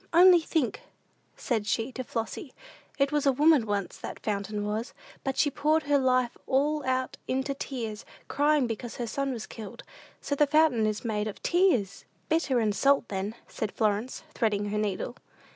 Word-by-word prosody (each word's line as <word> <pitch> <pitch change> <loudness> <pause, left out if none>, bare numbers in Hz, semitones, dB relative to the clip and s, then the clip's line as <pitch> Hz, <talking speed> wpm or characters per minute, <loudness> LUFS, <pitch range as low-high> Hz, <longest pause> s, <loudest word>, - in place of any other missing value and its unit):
"Only 355 +1 +8
think," 315 - -1 0.6
said 220 -4 -1
she 225 +4 0
to 255 0 -5
Flossy; 235 +4 -5 0.4
"it 275 0 +2
was 295 -1 +1
a - - +6
woman 290 -3 +4
once, 200 -2 -2
that - - -7
fountain 205 0 -2
was; 215 +3 -3 0.3
but 270 -1 -2
she 290 - +3
poured 305 +3 +2
her 285 -1 +3
life 255 -2 +2
all 290 +3 +1
out 260 0 -1
into 265 +2 -1
tears, 230 -6 -5 0.2
crying 290 -1 +2
because 230 0 -5
her 240 - -3
son 275 +4 -2
was 230 -4 -5
killed. 225 +1 -9 0.4
So - - -3
the 290 +1 +3
fountain 290 -7 +4
is 215 +2 -3
made 210 -2 -1
of 210 - -6
tears!" 345 - +2 0.2
"Bitter 310 -6 +2
and 215 -2 +1
salt, 275 -1 +3
then," 200 +2 -3
said 215 -3 -4
Florence, 215 +3 -1
threading 205 -2 0
her 210 - 0
needle. 210 +3 -2
255 Hz, 175 wpm, -28 LUFS, 215-285 Hz, 0.6 s, Only